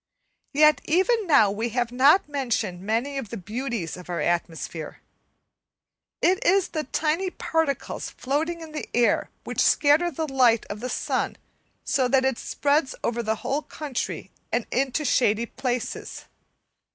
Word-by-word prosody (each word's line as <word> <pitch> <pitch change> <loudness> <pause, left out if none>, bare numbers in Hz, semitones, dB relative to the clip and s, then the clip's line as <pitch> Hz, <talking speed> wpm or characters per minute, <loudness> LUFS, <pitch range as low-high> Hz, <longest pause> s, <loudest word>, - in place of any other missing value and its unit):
Yet 305 +1 +5
even 380 +6 +2
now 245 -10 +5
we 225 +4 -2
have 240 -1 +1
not 280 +9 +5
mentioned 235 -10 -2
many 235 +8 -1
of 235 -6 -7
the 230 - -5
beauties 215 - -4
of 180 0 -12
our 175 - -2
atmosphere. 165 -2 -3 1.2
It 365 +1 +3
is 385 0 +3
the 310 -3 -3
tiny 320 +7 0
particles 320 -6 -2
floating 315 +6 -2
in 320 -1 -9
the 305 - -6
air 240 -1 +2
which - - -2
scatter 305 +4 +4
the 320 0 -3
light 250 -5 +3
of 205 - -6
the 250 +3 -4
sun - - -1 0.5
so 260 -2 +1
that 260 +1 +3
it 265 -3 0
spreads 285 -1 0
over 235 0 0
the 220 -1 0
whole 280 +3 0
country 295 -5 -5 0.2
and 235 - 0
into 270 +3 0
shady 235 -3 +2
places. 245 0 -4
265 Hz, 150 wpm, -25 LUFS, 230-305 Hz, 1.2 s, Yet